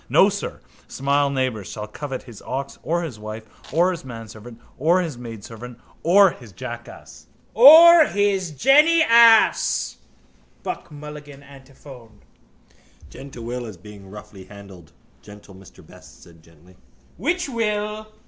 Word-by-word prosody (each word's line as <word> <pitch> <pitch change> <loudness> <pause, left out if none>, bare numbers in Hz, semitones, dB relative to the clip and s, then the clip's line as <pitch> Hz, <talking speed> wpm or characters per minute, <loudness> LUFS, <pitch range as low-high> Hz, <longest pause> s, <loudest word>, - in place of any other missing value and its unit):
No - - +4
sir - - -6 0.3
smile 140 +1 0
neighbour 130 -6 -2
shall 105 +3 -8
covet 130 +4 -7
his 115 -5 -14
ox 135 +1 -6
or 170 +1 -2
his 130 -10 -8
wife 110 +1 -9 0.3
or 175 +6 +2
his 170 -3 -7
manservant 115 -1 -11 0.2
or 165 +6 +2
his 165 -6 -4
maidservant 115 0 -11 0.2
or 195 +2 +4
his 120 -8 -14
jackass. 120 +2 -11 0.3
—Or 320 +6 +8
his 200 -5 -1
jennyass, 245 - +4 0.7
Buck - - -6
Mulligan 145 -1 -11
antiphoned. 135 -5 -16 0.9
—Gentle 135 -4 -11
Will 120 +1 -6
is 105 -5 -11
being 100 +1 -14
roughly 105 -2 -13
handled, 95 -5 -15 0.3
gentle 105 -1 -15
Mr 95 -2 -17
Best - - -18
said 85 -1 -19
gently. 85 +3 -22 0.4
—Which 350 +4 -2
will? 215 -3 -3
130 Hz, 130 wpm, -21 LUFS, -, 0.9 s, Or